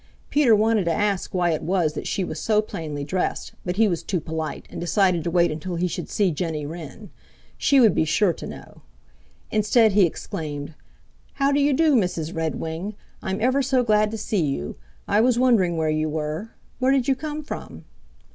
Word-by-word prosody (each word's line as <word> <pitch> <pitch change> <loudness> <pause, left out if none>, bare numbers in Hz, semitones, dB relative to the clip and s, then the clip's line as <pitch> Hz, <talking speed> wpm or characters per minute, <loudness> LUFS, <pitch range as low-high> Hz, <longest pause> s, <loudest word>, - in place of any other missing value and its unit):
Peter 275 -7 +5
wanted 215 -1 +2
to 170 - +1
ask 200 +1 0
why 175 -2 +1
it 155 - -1
was 175 -4 +1
that - - -5
she 195 - -1
was 155 -3 -5
so 210 +5 +2
plainly 155 -8 -4
dressed, 185 +5 -2
but 180 0 -2
he 220 +2 +4
was 170 -4 -1
too 180 +1 -2
polite 160 0 -5
and - - -6
decided 175 -1 +2
to 170 - -1
wait 175 -1 +3
until 160 +4 -4
he 175 +2 0
should - - -5
see 200 -4 +1
Jenny 155 -2 -3
Wren. 165 +5 -9 0.4
She 280 - +3
would 225 -5 +6
be - - +2
sure 170 +4 +2
to - - -8
know. - - -11 0.7
Instead, 215 +1 +4
he 195 -2 +5
exclaimed, 150 -2 -6 0.6
"How 275 0 +1
do 285 - +2
you 285 +1 +3
do, 315 +2 +3
Mrs. 180 - 0
Redwing? 165 +4 -3 0.3
I'm 190 +2 -3
ever 260 +4 +3
so 260 -1 +2
glad 215 -2 +3
to 220 - -5
see 210 -2 -1
you. 135 - -3 0.3
I 210 - +3
was 245 0 +3
wondering 220 -9 +3
where 160 -1 +1
you 155 0 0
were. 155 +7 -3 0.3
Where 260 +1 +3
did 270 -3 +2
you 270 - +4
come 305 +2 -5
from?" - - -8
185 Hz, 200 wpm, -23 LUFS, 160-225 Hz, 0.7 s, would